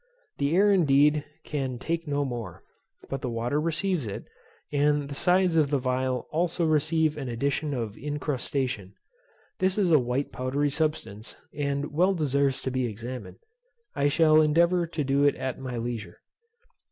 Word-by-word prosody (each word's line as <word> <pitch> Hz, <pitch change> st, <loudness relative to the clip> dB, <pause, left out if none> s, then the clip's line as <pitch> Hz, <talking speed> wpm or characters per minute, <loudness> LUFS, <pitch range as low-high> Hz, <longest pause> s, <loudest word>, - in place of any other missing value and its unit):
The 140 Hz, +3 st, +1 dB
air 205 Hz, +2 st, +5 dB
indeed, 150 Hz, -4 st, +4 dB, 0.2 s
can 135 Hz, -4 st, -3 dB
take 165 Hz, +5 st, -3 dB
no 145 Hz, 0 st, 0 dB
more; 115 Hz, -9 st, -6 dB, 0.4 s
but 135 Hz, -1 st, -4 dB
the 125 Hz, -, -2 dB
water 120 Hz, +6 st, -1 dB
receives 165 Hz, -, 0 dB
it, 100 Hz, -, -6 dB, 0.5 s
and 145 Hz, 0 st, +2 dB
the -, -, -5 dB
sides 180 Hz, +2 st, +3 dB
of 150 Hz, -3 st, +3 dB
the 140 Hz, -1 st, +1 dB
phial 130 Hz, 0 st, -1 dB
also 170 Hz, +1 st, 0 dB
receive 155 Hz, 0 st, +2 dB
an 135 Hz, -4 st, -4 dB
addition 140 Hz, +5 st, -1 dB
of 115 Hz, -4 st, -4 dB
incrustation. 135 Hz, -7 st, -3 dB, 0.6 s
This 185 Hz, +1 st, +1 dB
is 190 Hz, -5 st, +2 dB
a 155 Hz, -, +7 dB
white 125 Hz, +3 st, -2 dB
powdery 140 Hz, +3 st, -1 dB
substance, 150 Hz, -8 st, -2 dB, 0.2 s
and 140 Hz, 0 st, -2 dB
well 185 Hz, +5 st, +3 dB
deserves 140 Hz, -4 st, 0 dB
to 130 Hz, -, -2 dB
be 130 Hz, -1 st, 0 dB
examined. 120 Hz, +4 st, -7 dB, 0.6 s
I 140 Hz, -, +2 dB
shall 155 Hz, +1 st, +5 dB
endeavour 170 Hz, +3 st, +3 dB
to 160 Hz, -2 st, -3 dB
do 140 Hz, +1 st, +2 dB
it 145 Hz, -, +4 dB
at 130 Hz, -, -4 dB
my 130 Hz, -2 st, -5 dB
leisure. 115 Hz, -6 st, -5 dB
145 Hz, 160 wpm, -27 LUFS, 130-155 Hz, 0.6 s, a